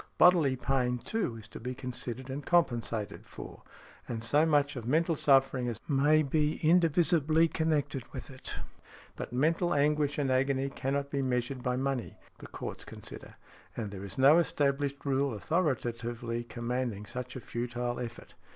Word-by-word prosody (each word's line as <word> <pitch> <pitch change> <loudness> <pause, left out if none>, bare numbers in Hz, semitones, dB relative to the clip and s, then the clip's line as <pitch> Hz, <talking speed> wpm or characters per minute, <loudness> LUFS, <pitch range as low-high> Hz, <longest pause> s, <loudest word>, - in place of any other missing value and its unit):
Bodily 165 -7 +6
pain, 125 0 0
too, 190 - -2
is 110 -1 -10
to - - -9
be 125 +3 -5
considered 125 +1 -4
and 140 +2 -4
compensated 120 -10 0
for; - - -10 0.5
and 115 -2 -4
so 145 +7 +3
much 145 -2 +2
of 120 -3 -6
mental 165 +5 +2
suffering 135 -3 +3
as 115 -2 -3
may 150 +2 +4
be 150 +2 +1
indivisibly 165 -1 +4
connected 150 -6 -1
with 130 +1 -7
it; 130 - -6 0.6
but - - -6
mental 160 +7 +2
anguish 145 0 +2
and 140 -3 +1
agony 135 +1 +1
cannot 140 +1 -2
be 140 - 0
measured 125 0 -1
by 125 0 0
money—the 135 -1 -4
courts - - -7
consider—and 110 -4 -9
there 100 -1 -7
is 95 -1 -7
no 140 +5 +7
established 140 -3 0
rule 135 -2 +1
authoritatively 120 - -1
commanding 120 -2 -3
such 125 +3 -6
a - - -4
futile 120 +1 -3
effort. 120 -1 -7
135 Hz, 150 wpm, -30 LUFS, 120-150 Hz, 0.6 s, no